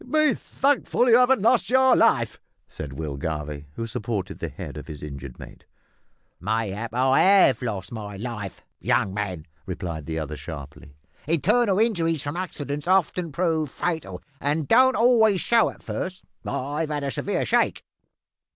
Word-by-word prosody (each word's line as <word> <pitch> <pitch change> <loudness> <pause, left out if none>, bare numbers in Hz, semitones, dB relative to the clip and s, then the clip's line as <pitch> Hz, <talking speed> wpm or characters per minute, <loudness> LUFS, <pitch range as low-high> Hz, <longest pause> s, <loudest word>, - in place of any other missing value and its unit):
"Be 310 +2 +3
thankful 270 -2 +1
you 235 - +7
haven't 250 -4 +4
lost 235 +1 +3
your 260 0 +5
life," - - +2 0.3
said 70 -3 -8
Will 75 -1 -5
Garvie, 75 0 -4
who 115 - -3
supported 110 -4 -4
the - - -3
head - - -8
of - - -8
his 75 -2 -8
injured 70 -3 -8
mate. - - -12 0.8
"Mayhap 110 +2 -2
I 130 +1 +3
have 190 - +5
lost 110 -3 -4
my 105 -3 -6
life, 105 -3 -6 0.2
young 95 - +1
man," 95 -6 -4 0.2
replied 85 -5 -5
the 80 0 -3
other 75 -1 -4
sharply. 75 -2 -9 0.3
"Internal 190 - +2
injuries 170 - +1
from 145 +2 -4
accidents 150 -5 -4
often 180 -2 +2
prove 160 -1 0
fatal, 145 - -3 0.2
and 145 +1 -1
don't 260 +2 +5
always 225 -5 +4
show 230 +3 +3
at - - -13
first. 185 0 -5 0.2
I've 150 +4 -2
had 145 -1 -2
a 140 - -1
severe - - -1
shake." - - +1
135 Hz, 155 wpm, -24 LUFS, -, 0.8 s, you